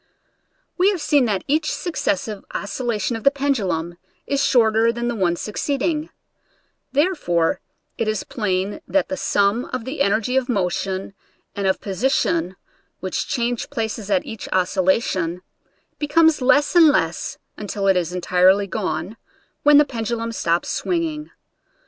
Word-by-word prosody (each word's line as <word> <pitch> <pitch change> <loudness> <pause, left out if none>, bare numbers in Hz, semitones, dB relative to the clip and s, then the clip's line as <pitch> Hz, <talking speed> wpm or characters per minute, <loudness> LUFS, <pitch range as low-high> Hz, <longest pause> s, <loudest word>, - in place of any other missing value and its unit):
We 375 +2 +5
have 395 -4 -1
seen 290 -4 +3
that 200 -5 -1
each 305 +2 +1
successive 210 - -2
oscil 205 +5 -4
lation 230 0 -1
of 225 - -6
the - - +7
pendulum 205 - -1 0.3
is 280 0 0
shorter 225 -2 +4
than 240 +1 -3
the - - -1
one 180 -5 +1
succeeding; 290 - -2 0.8
therefore 275 - +1 0.4
it 230 - 0
is 215 -1 -1
plain 195 -3 -2
that 290 - +1
the 285 - -2
sum 205 -2 +1
of 230 - -5
the 275 +3 -4
energy 225 +3 +1
of 260 0 0
motion 190 -2 -1 0.4
and 200 -1 -1
of 190 - 0
position 190 -4 0 0.4
which 185 -1 -3
change 240 -1 -2
places 220 -2 -4
at 275 +7 +1
each 225 -7 -7
oscillation, 185 -1 +1 0.6
be 295 - -2
comes 320 -1 +4
less 290 +6 +3
and 335 -2 +8
less, 295 - 0 0.2
until 205 -1 -4
it 195 -1 +4
is 175 -2 0
entirely 180 +2 +3
gone, 195 +1 -3 0.4
when 295 0 +6
the 295 - +6
pendulum 230 -2 -3
stops 170 -6 0
swinging. 320 -4 -2
225 Hz, 145 wpm, -21 LUFS, 190-280 Hz, 0.8 s, and